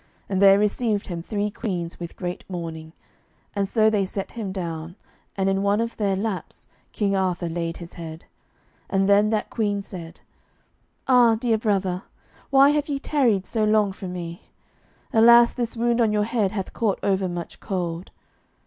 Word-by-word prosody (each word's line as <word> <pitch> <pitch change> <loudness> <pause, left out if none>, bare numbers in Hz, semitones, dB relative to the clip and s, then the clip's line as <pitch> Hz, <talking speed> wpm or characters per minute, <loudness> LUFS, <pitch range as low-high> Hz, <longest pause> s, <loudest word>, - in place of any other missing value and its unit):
And 190 -1 -1
there 195 0 +8
received 210 0 0
him 170 -2 -5
three 205 +3 -2
queens 180 -7 -4
with 170 -1 -7
great 180 -1 -5
mourning, 165 -3 -6 0.6
and 200 -1 0
so 220 +1 +3
they 210 -2 +2
set 195 +1 -4
him 215 -5 -5
down, 170 -2 -5 0.4
and 190 0 +1
in 195 0 +1
one 200 +1 +2
of 230 0 -2
their 200 -3 +1
laps 200 -1 -4 0.3
King 200 -2 0
Arthur 185 -2 0
laid 165 0 -3
his 170 -1 -10
head, 165 -1 -8 0.6
and 195 0 +2
then 205 +1 +5
that 215 -1 -1
queen 205 -3 -1
said, 170 -5 -9 0.9
"Ah, 245 -3 +6
dear 225 -1 0
brother, 195 -4 0 0.5
why 275 0 +6
have 295 0 0
ye 285 - 0
tarried 250 -9 +1
so 220 -2 -1
long 215 -2 +3
from 190 -1 -7
me? 170 -1 -6 0.7
Alas, 235 +1 +7
this 235 -2 -3
wound 235 +1 +2
on 220 -2 +3
your 210 0 +2
head 215 -3 0
hath 195 -3 -4
caught 215 -4 0
over 190 -2 +1
much 175 -1 -6
cold." 175 -2 -3
200 Hz, 170 wpm, -24 LUFS, 180-220 Hz, 0.9 s, there